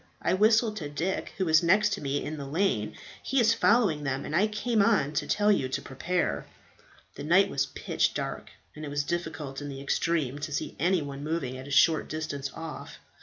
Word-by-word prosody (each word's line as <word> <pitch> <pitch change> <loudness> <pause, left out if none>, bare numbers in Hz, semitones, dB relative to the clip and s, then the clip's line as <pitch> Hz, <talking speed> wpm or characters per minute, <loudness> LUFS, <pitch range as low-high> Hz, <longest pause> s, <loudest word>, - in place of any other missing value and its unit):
I - - 0
whistled 220 +2 +3
to 150 -6 -5
Dick, 165 +6 -3
who 190 - 0
was 160 -2 +5
next 200 +5 +4
to - - -4
me 140 0 -2
in 155 +1 -4
the 140 -1 -6
lane. 145 - 0 0.3
He 270 - 0
is 230 -1 +5
following 215 -9 +3
them, 135 -1 -2
and 155 - -3
I 200 +5 +4
came 215 +1 0
on 195 -9 +2
to 145 - -1
tell 210 0 +3
you 135 -10 +1
to - - -2
prepare." 135 - -2 0.7
The - - -8
night 190 +6 +4
was 135 0 0
pitch - - -1
dark, - - -4 0.3
and 155 - -8
it 150 - -5
was 145 0 -1
difficult 155 -4 -4
in 145 - -5
the 135 -1 -7
extreme 145 0 -1
to 150 +1 -5
see - - -3
any 175 +1 +2
one 140 0 -7
moving 150 -5 -2
at 130 +1 -8
a - - -8
short 160 +3 +4
distance 145 -3 -4
off. 165 -1 -8
155 Hz, 215 wpm, -28 LUFS, 140-195 Hz, 0.7 s, was